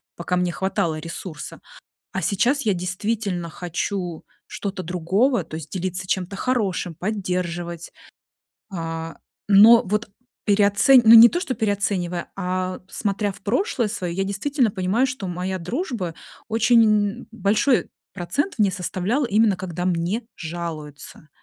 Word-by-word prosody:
пока 180 +1 -2
мне 180 -1 0
хватало 170 -4 -1
ресурса, 165 -1 -7 0.5
а - - -2
сейчас 240 +8 +1
я 210 -4 +1
действительно 185 0 -2
хочу 175 0 -4 0.2
что-то 200 -3 -5
другого, 185 +7 +1
то 155 - -11
есть 155 -2 -8
делиться 185 0 -3
чем-то 190 +1 -2
хорошим, 200 -8 -1
поддерживать, 175 -3 -3 0.8
а. 165 -1 -5 0.3
Но 215 +4 +8
вот, 210 +3 -1 0.4
переоце 205 +5 +5
ну, 225 +1 +8
не 230 +1 +10
то 350 - -1
что 290 -8 -3
переоценивая, 195 -5 -1
а 185 -1 -3
смотря 205 -1 -1
в - - -15
прошлое 240 - 0
своё, 180 -5 -4
я 195 +2 -1
действительно 230 +4 0
понимаю, 200 +7 +1
что 250 -6 -5
моя 180 +2 -3
дружба 190 - -4 0.3
очень 230 +1 +4 0.4
н - - -14
большой 220 +5 +1 0.2
процент 200 - -2
мне 205 -3 +3
составляла, 190 - -1
именно 215 -2 +3
когда 180 -1 -5
мне 180 +6 -1
жалуются. 155 -3 -7
190 Hz, 130 wpm, -23 LUFS, 175-220 Hz, 0.8 s, не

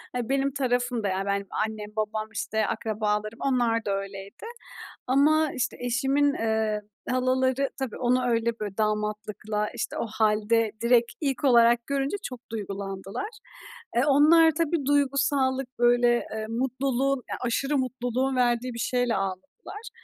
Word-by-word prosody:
Ya, 245 -1 -2
benim 275 0 +1
tarafım 245 -4 0
da, - - +1
yani, 190 0 -1
benim 200 0 -1 0.2
annem, 215 -1 -7
babam, 215 0 -2
işte, 220 0 -1
akrabalarım, 215 -1 -2
onlar 240 -4 +1
da 205 - -1
öyleydi. 195 - -8 0.6
Ama, 300 +4 +3
işte, 245 -1 -2
eşimin, 270 +4 +1
eee, 220 -2 0 0.3
halaları 260 +1 +1
tabii 265 -4 -4
onu 250 +1 +1
öyle, 230 -1 0
böyle, 205 -2 -5
damatlıkla, 210 0 -2
işte, - - -3
o - - -2
halde 220 +1 +1
direkt 235 0 +3
ilk 270 -4 -1
olarak 235 -2 +5
görünce 280 +6 -1
çok 250 -2 -6
duygulandılar. 195 - -5 0.7
Eee, 240 - +4
onlar 315 +3 +6
tabii 320 -2 -1
duygusallık, 270 -2 +1
böyle, 240 0 +4
eee, 220 0 -3
mutluluğun, 265 +3 0
eee, 255 - -7
aşırı 270 +4 0
mutluluğun 255 0 -1
verdiği 245 0 +1
bir 235 - -7
şeyle 245 -2 0
ağladılar. 195 - -6
240 Hz, 140 wpm, -26 LUFS, 215-270 Hz, 0.7 s, onlar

